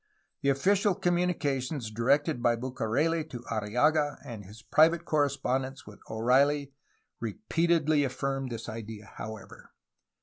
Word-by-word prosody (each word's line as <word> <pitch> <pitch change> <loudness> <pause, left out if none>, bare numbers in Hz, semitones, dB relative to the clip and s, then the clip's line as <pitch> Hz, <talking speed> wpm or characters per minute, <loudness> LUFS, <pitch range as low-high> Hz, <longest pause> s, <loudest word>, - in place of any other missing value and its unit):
The 140 - +2
official 190 +8 +3
communications 150 -9 -1
directed 140 +5 +1
by 120 -1 +3
Bucareli 130 +6 0
to 120 -3 -8
Arriaga 135 +8 +1
and 115 -5 -7
his 105 +4 -13
private 165 +2 +4
correspondence 135 -3 0
with 105 0 -13
O'Reilly 135 +5 +2 0.5
repeatedly 155 - +1
affirmed 135 0 -2
this 115 - -6
idea, 110 -1 -7
however. 110 -1 -9
135 Hz, 110 wpm, -29 LUFS, 115-155 Hz, 0.5 s, private